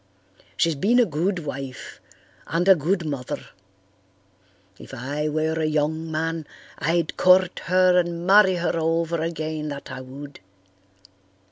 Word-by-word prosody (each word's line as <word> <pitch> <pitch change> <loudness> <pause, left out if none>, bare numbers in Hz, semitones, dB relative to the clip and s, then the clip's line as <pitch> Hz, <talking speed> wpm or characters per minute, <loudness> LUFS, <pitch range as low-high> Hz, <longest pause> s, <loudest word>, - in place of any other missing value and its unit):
She's 165 - +2
been 210 - +2
a 245 - +5
good 170 +1 -2
wife 135 -2 -7 0.5
and 170 +3 0
a 195 - +9
good 175 +2 -1
mother. 140 -5 -4 1.4
If - - -10
I 145 +5 -3
were 155 +1 -1
a 160 - 0
young 155 +1 -1
man 160 0 -3 0.3
I'd 165 +2 0
court 185 0 +4
her 185 0 +4
and 170 -1 -2
marry 190 -1 +6
her 175 -1 -1
over 165 0 0
again, 155 -2 -3
that 140 -2 -7
I 130 0 -6
would. 140 +2 -10
160 Hz, 135 wpm, -23 LUFS, 150-175 Hz, 1.4 s, a